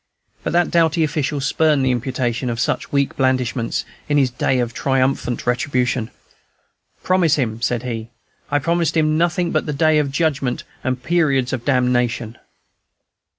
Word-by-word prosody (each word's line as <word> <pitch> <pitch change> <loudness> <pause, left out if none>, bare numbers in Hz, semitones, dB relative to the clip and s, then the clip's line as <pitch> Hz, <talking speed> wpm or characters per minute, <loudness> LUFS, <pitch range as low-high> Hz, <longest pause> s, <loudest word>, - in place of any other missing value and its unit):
But - - -2
that 175 0 +2
doughty 165 -1 +3
official 150 -1 -1
spurned 145 0 +2
the 130 - +3
imputation 125 0 -2
of 115 -1 -3
such - - -1
weak 140 -1 +1
blandishments, 130 -3 0 0.2
in 145 - +3
this 135 -3 +3
day 130 +1 0
of 120 -1 -1
triumphant 135 -2 0
retribution. 125 -1 0 0.9
"Promise 180 -4 +3
him!" 115 -5 -2
said 125 0 0
he, 115 -2 -5 0.4
"I 145 - +2
promised 170 +2 0
him 155 -1 +2
nothing 175 +1 +1
but - - 0
the 150 - -1
Day 155 +1 +3
of 145 -2 0
Judgment 135 -4 -1 0.2
and 130 -1 -2
Periods 140 -5 +1
of 120 -2 -4
Damnation!" 125 -3 0
135 Hz, 150 wpm, -20 LUFS, 125-155 Hz, 0.9 s, doughty